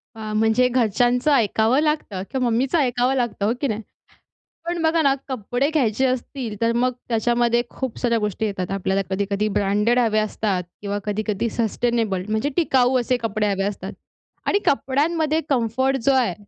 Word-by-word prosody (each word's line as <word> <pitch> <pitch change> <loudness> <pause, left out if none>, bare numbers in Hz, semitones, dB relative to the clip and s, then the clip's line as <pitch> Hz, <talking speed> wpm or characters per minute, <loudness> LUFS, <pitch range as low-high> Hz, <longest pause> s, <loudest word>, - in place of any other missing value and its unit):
आ, 215 -1 -6
म्हणजे 220 +3 +3
घरच्यांचं 245 +3 +2
ऐकावं 230 0 +3
लागतं 300 -11 -1
किंवा 260 -2 0
मम्मीच 255 +6 0
ऐकावं 255 -4 +2
लागतं, 240 -5 -1
हो 220 - +2
की 280 - +1
नाही? 220 -1 -3 0.8
पण 340 0 -2
बघा 320 +1 +3
ना 280 -3 +4
कपडे 255 +2 -1
घ्यायचे 265 -4 +1
असतील, 255 -3 -3
तर 230 - +3
मग 250 +1 +1 0.2
त्याच्यामध्ये 235 +1 +2
खूप 260 -4 -5
साऱ्या 235 -2 +1
गोष्टी 210 0 -2
येतात. 195 -3 -3
आपल्याला 195 0 0
कधी-कधी 200 +2 -1
ब्रँडेड 210 +5 +2
हव्या 215 -2 +2
असतात 205 -3 -2 0.2
किंवा 205 0 -3
कधी-कधी 215 +2 -1
सस्टेनेबल 225 -4 -1
म्हणजे 220 +6 0
टिकाऊ, 260 -6 +3
असे 250 +1 0
कपडे 215 -2 -1
हवे 195 0 -1
असतात 200 0 -4 0.5
आणि 405 - +3
कपड्यांमध्ये 305 +3 +1
कम्फर्ट 260 +1 +1
जो 275 - +4
आहे, 250 -8 +2
235 Hz, 160 wpm, -22 LUFS, 215-260 Hz, 0.8 s, ना